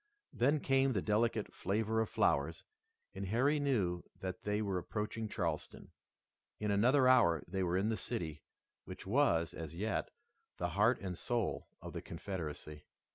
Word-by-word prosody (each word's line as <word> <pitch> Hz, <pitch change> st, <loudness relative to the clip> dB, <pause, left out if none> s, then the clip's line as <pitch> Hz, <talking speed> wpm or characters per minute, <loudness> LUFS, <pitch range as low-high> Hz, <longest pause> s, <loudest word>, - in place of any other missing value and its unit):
Then 140 Hz, +5 st, +2 dB
came 135 Hz, -1 st, +3 dB
the 95 Hz, -, +1 dB
delicate 110 Hz, 0 st, +1 dB
flavor 110 Hz, +4 st, 0 dB
of 110 Hz, -, -1 dB
flowers 75 Hz, +4 st, +1 dB, 0.5 s
and 95 Hz, 0 st, -4 dB
Harry 130 Hz, +9 st, +2 dB
knew 100 Hz, -12 st, +1 dB, 0.2 s
that 95 Hz, -2 st, -5 dB
they 105 Hz, 0 st, +1 dB
were 100 Hz, -4 st, 0 dB
approaching 110 Hz, +3 st, -3 dB
Charleston. 85 Hz, -7 st, -3 dB, 0.7 s
In 105 Hz, -1 st, 0 dB
another 125 Hz, +6 st, +4 dB
hour 120 Hz, -10 st, +5 dB
they 95 Hz, +2 st, -2 dB
were 90 Hz, 0 st, +1 dB
in 100 Hz, +3 st, +1 dB
the 110 Hz, -, 0 dB
city 80 Hz, -4 st, -4 dB, 0.4 s
which 95 Hz, -, -9 dB
was, 95 Hz, -, +2 dB
as 80 Hz, 0 st, -7 dB
yet, 105 Hz, +4 st, -1 dB, 0.5 s
the 90 Hz, -, -1 dB
heart 105 Hz, +8 st, +3 dB
and 95 Hz, -2 st, -3 dB
soul 120 Hz, +3 st, -1 dB, 0.2 s
of -, -, -7 dB
the -, -, -4 dB
Confederacy. 75 Hz, -5 st, -6 dB
100 Hz, 155 wpm, -35 LUFS, 90-115 Hz, 0.7 s, hour